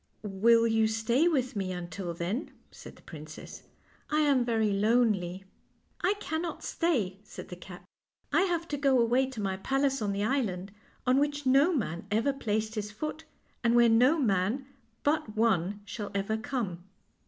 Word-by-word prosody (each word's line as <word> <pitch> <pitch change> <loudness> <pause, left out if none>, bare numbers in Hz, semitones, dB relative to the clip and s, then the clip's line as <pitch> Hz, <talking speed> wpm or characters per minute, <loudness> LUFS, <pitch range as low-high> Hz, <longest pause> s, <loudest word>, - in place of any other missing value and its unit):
"Will 225 +3 +4
you 225 -1 +3
stay 225 +8 +2
with 265 -6 0
me 190 -2 -2
until 180 0 -5
then?' 185 - -2
1 - - -20 0.2
said - - -12
the - - -20
princess. 155 -1 -10 0.2
" - - -31
I 305 0 +2
am 280 -4 +3
very 225 -3 +1
lonely." 200 -4 +1 0.3
" - - -28
I 395 +3 +2
cannot 335 -4 -4
stay," 225 - 0
said - - -10
the 180 - -6
cat. 180 +1 -12 0.3
" - - -29
I - - +5
have 335 -1 -1
to 290 - -2
go 270 -2 +3
away 245 +3 +3
to 260 -4 -8
my 195 -2 -1
palace 270 +5 0
on 205 -2 0
the 200 +1 -1
island 205 -7 -1 0.3
on 255 +1 +4
which 290 0 -1
no 275 +6 +5
man 185 - -2
ever 230 +7 +1
placed 220 -4 -2
his 210 -2 -3
foot, 305 +9 -5 0.4
and 235 0 +3
where 240 -1 +6
no 250 +8 +5
man 220 - +1 0.4
but 290 -8 0
one 205 -3 +1
shall 205 -1 -5
ever 200 +2 0
come." 220 -6 -3
225 Hz, 180 wpm, -29 LUFS, 200-270 Hz, 0.4 s, where